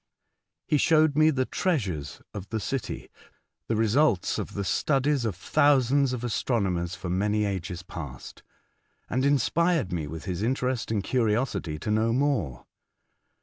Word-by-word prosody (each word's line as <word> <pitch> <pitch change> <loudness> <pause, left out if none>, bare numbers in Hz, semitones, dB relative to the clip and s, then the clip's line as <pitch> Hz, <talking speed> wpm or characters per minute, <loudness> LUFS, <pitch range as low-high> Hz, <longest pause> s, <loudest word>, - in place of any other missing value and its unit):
He 150 - +2
showed 155 -2 +4
me 155 +1 +5
the 130 -4 +1
treasures 95 - -2
of 100 -1 -7
the 110 - -2
city 120 0 -4 0.3
— - - -49
the 115 - 0
results 110 - +2
of - - -5
the 100 - -2
studies 140 +4 +1
of 105 -5 -1
thousands 135 - +3
of 125 -2 -4
astro 120 0 0
nomers 90 -3 -1
for 95 - -7
many 105 +4 +1
ages 90 -3 -4
past, 80 -8 -8 0.7
and 130 +2 +1
inspired 145 - +2
me 80 -4 -2
with 80 +1 -7
his 90 0 -3
interest 125 +1 -1
and 105 -3 0
curiosity 110 - 0
to 95 +7 -3
know 110 +2 +2
more. 130 - 0
115 Hz, 150 wpm, -27 LUFS, 95-135 Hz, 0.7 s, me